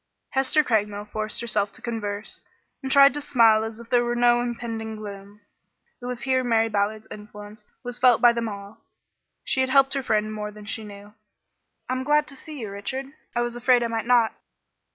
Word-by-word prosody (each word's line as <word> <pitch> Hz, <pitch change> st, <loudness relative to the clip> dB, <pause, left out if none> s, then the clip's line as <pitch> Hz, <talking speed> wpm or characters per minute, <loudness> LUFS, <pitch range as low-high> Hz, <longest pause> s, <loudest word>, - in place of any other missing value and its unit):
Hester 270 Hz, +3 st, +2 dB
Craigmile 210 Hz, -4 st, -1 dB
forced 215 Hz, +2 st, -4 dB
herself 210 Hz, -4 st, -1 dB
to -, -, -11 dB
converse, 210 Hz, -3 st, -5 dB, 0.4 s
and 265 Hz, -1 st, -4 dB
tried 275 Hz, -1 st, +7 dB
to 295 Hz, -, -3 dB
smile 225 Hz, -5 st, +4 dB
as 225 Hz, 0 st, -6 dB
if 235 Hz, 0 st, -13 dB
there 245 Hz, -1 st, +4 dB
were 240 Hz, 0 st, -1 dB
no 240 Hz, 0 st, +4 dB
impending 230 Hz, -2 st, -4 dB
gloom. 205 Hz, -1 st, -10 dB, 0.6 s
It 245 Hz, -, -6 dB
was 250 Hz, -1 st, -4 dB
here 260 Hz, -1 st, +1 dB
Mary 225 Hz, -2 st, +2 dB
Ballard's 215 Hz, +1 st, -1 dB
influence 210 Hz, 0 st, -11 dB, 0.2 s
was 245 Hz, 0 st, -5 dB
felt 250 Hz, -2 st, +5 dB
by 240 Hz, -1 st, +6 dB
them 230 Hz, -1 st, -2 dB
all. 200 Hz, 0 st, -9 dB, 0.6 s
She 260 Hz, -, +1 dB
had 260 Hz, -, 0 dB
helped 270 Hz, 0 st, +4 dB
her 275 Hz, -, 0 dB
friend 215 Hz, -3 st, 0 dB
more 210 Hz, -1 st, -4 dB
than 210 Hz, 0 st, -12 dB
she 220 Hz, +1 st, -4 dB
knew. 205 Hz, 0 st, -12 dB, 0.7 s
"I'm 255 Hz, 0 st, -2 dB
glad 295 Hz, +2 st, +3 dB
to 275 Hz, -, -9 dB
see 300 Hz, +2 st, -10 dB
you, 215 Hz, -3 st, -5 dB
Richard; 260 Hz, +7 st, -5 dB, 0.2 s
I 240 Hz, -, +1 dB
was 240 Hz, 0 st, -2 dB
afraid 245 Hz, 0 st, +3 dB
I -, -, 0 dB
might 225 Hz, 0 st, -3 dB
not." 240 Hz, -2 st, +4 dB
230 Hz, 195 wpm, -24 LUFS, 210-250 Hz, 0.7 s, tried